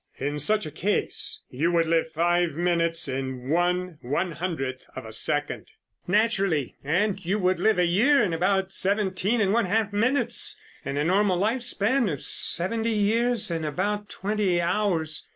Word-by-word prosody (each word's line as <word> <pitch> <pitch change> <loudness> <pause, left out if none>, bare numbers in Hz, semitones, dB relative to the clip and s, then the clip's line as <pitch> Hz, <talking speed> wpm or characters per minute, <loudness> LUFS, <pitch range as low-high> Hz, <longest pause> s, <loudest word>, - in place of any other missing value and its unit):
In 145 +2 -3
such 210 +6 +1
a 155 - -6
case 205 +7 -2
you 160 +7 0
would 165 -1 +3
live 165 0 +1
five 175 +1 +1
minutes 170 0 0
in 130 -1 -4
one 175 0 0
one 170 +8 -1
hundredth 150 -6 -4
of 130 - -7
a 110 - -8
second." 145 +6 0 0.4
"Naturally, 195 - +1
and 190 +7 0
you 190 +5 0
would 185 -2 +1
live 220 -2 +3
a 180 - +3
year 230 +12 +4
in 180 -5 -1
about 190 +3 +1
seventeen 200 +3 0
and 200 -2 +2
one 235 -2 +2
half 205 +2 0
minutes, 240 +2 +1 0.2
and 140 0 -4
a 145 - +1
normal 190 +2 +2
lifespan 235 +2 +1
of 145 - -5
seventy 225 +6 0
years 225 0 +1
in 165 -1 -2
about 205 +7 -2
twenty 200 -3 -1
hours. 170 -4 -1
180 Hz, 160 wpm, -25 LUFS, 160-210 Hz, 0.4 s, year